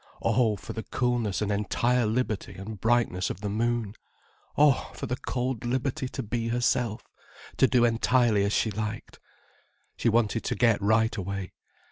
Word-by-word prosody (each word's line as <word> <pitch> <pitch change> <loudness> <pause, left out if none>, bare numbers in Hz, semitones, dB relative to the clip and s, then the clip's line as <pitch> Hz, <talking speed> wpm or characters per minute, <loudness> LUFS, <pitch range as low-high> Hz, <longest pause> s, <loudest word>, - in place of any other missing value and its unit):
Oh, 115 -4 +2
for 100 - -8
the 110 - -4
coolness 120 -5 -1
and 105 - -1
entire 120 +3 +1
liberty 110 -2 -2
and 100 +1 -8
brightness 110 -6 +1
of 95 - -6
the 105 - -2
moon. 115 -1 -1 0.6
Oh, 145 -3 +4
for - - -5
the 125 - -2
cold 125 -2 -3
liberty 130 +2 -1
to 135 - -5
be 115 +1 -2
herself, 120 -1 0 0.5
to 130 - +5
do 125 -2 +4
entirely 115 -2 +3
as 100 - 0
she 110 - +1
liked. 110 +2 -5 0.8
She - - +2
wanted 115 0 +1
to - - -1
get 115 -4 +3
right 110 +2 +2
away. 95 -2 -4
115 Hz, 160 wpm, -27 LUFS, 105-125 Hz, 0.8 s, to